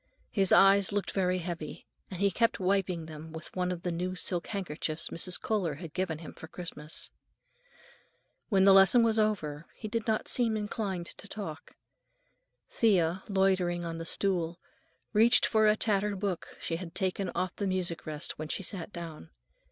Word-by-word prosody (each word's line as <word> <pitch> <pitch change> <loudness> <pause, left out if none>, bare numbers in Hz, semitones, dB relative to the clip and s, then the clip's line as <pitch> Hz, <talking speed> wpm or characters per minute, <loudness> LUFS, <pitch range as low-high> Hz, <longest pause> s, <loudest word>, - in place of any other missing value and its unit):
His 195 -3 +2
eyes 195 0 +6
looked 205 0 -1
very 185 -1 +1
heavy, 170 -3 -6 0.2
and 185 - -7
he 200 0 +3
kept 230 +5 +1
wiping 185 -3 0
them 160 0 -9
with 160 0 -9
one 180 -1 0
of 175 -1 -5
the 180 - -1
new 180 +2 -2
silk 180 -1 0
handkerchiefs 165 -5 -2
Mrs. 180 +1 +2
Kohler 190 -9 -1
had 160 0 -9
given 180 -4 -1
him 160 0 -10
for 160 - -10
Christmas. 160 -3 -7 1.4
When 195 -4 +4
the 195 0 +8
lesson 195 +5 +7
was 225 -1 +3
over 165 -8 -1
he 215 - -6
did 225 +1 -3
not 220 -1 0
seem 230 -3 +1
inclined 205 -4 -3
to 200 - -7
talk. 195 -7 -7 1.0
Thea, 185 -5 +2
loitering 185 -3 +2
on 165 0 -4
the 165 - -5
stool, 175 -2 0 0.5
reached 225 +3 +6
for 220 -1 +3
a 210 - +5
tattered 205 -2 +1
book 190 -4 -3
she 165 - -2
had 170 -2 -8
taken 190 0 -1
off 185 -1 -1
the 200 - -2
music 180 -4 -2
rest 150 -1 -3
when 155 - -4
she 195 - -3
sat 180 0 -3
down. 165 - -8
185 Hz, 175 wpm, -30 LUFS, 170-200 Hz, 1.4 s, the